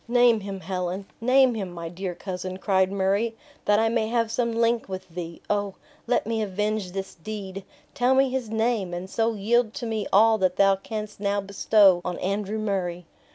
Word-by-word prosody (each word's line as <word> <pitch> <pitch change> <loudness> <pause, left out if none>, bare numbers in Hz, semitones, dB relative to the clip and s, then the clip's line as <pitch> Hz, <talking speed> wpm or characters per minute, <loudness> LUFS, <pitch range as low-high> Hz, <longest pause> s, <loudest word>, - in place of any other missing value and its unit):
"Name 240 -1 +4
him, 195 -1 -6
Helen; 185 +1 -3 0.2
name 255 +1 +5
him, 200 -5 -4
my 170 -1 -6
dear 180 +1 -5
cousin," 185 0 -5
cried 190 -1 +2
Murray, 200 +4 0 0.3
"that 210 - +4
I 225 +1 +3
may 225 -1 +1
have 230 -1 0
some 235 0 0
link 230 -1 +1
with 185 0 -6
thee. 170 0 -7
O! 205 -1 -1 0.3
let - - +1
me 225 0 -1
avenge 210 -1 -2
this 195 0 -5
deed! 195 +1 -7 0.3
Tell 260 -1 +2
me 270 +1 +4
his 255 -4 -2
name! 220 -5 0
and 180 +2 -5
so 225 +3 0
yield 225 +2 +1
to 240 - -4
me 220 -3 -2
all 220 +2 +5
that 185 -1 +2
thou 195 -1 +5
canst 210 +1 -6
now 200 0 0
bestow 200 -1 +4
on 180 -1 -3
Andrew 200 +2 -2
Murray!" 185 -5 -2
205 Hz, 190 wpm, -25 LUFS, 190-225 Hz, 0.3 s, name